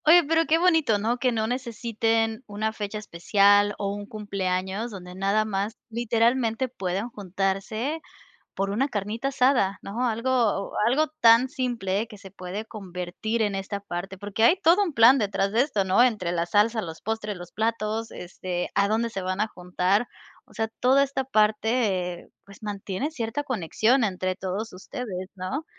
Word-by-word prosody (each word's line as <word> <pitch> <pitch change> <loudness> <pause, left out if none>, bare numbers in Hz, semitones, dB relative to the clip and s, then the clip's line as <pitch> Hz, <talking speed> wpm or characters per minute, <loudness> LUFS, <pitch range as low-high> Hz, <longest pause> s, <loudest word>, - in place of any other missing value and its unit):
Oye, 340 +3 +8
pero 325 +1 +3
qué 320 - +4
bonito, 325 - +3
¿no?, 225 +4 0
que 255 -1 +2
no 220 -2 0
necesiten 225 -1 -1
una 215 +1 -2
fecha 210 -1 -4
especial, 205 +1 +3
o 200 -1 -2
un 205 0 -7
cumpleaños, 195 0 -2
donde 180 -4 -9
nada 200 +3 +1
más, 210 +2 -2
literalmente, 235 +1 +1
pueden 195 -1 -3
juntarse 205 - -2 0.5
por 195 0 -1
una 250 +8 0
carnita 220 +4 -2
asada, 250 -8 +2
¿no?, 230 +6 -3
algo 230 -3 0
algo 280 +7 +3
tan 230 +3 +6
simple, 235 -7 -1
que 210 -2 -13
se 195 - -11
puede 185 +2 -6
convertir 195 +2 -4
en 205 -2 +1
esta 195 +1 -4
parte. 190 0 -6
Porque 205 +2 -2
hay 235 - +7
todo 360 +5 +5
un 345 -6 -3
plan 240 +2 +7
detrás 200 -3 0
de 225 +3 +3
esto, 245 -9 0
¿no?, 190 +5 +4
entre 210 -8 +1
la 170 -1 0
salsa, 215 +5 +2
los 165 -2 -8
postres, 220 -1 -3
los 175 -1 -10
platos, 225 0 -2
este, 180 0 -5
a 200 0 +3
dónde 225 +3 0
se 195 -4 -5
van 185 +2 -1
a 215 - +1
juntar. 180 +3 0 0.4
O - - -21
sea, 220 -1 -1
toda 265 +2 +4
esta 275 -1 0
parte, 215 -5 +1
eh, - - -17 0.2
pues, 200 +2 -15
mantiene 205 +5 -3
cierta 265 -1 -3
conexión 240 - +1
entre 185 -2 -1
todos 195 +4 -4
ustedes, 185 -1 -6
¿no?, 205 - -4
215 Hz, 170 wpm, -25 LUFS, 195-240 Hz, 0.5 s, Oye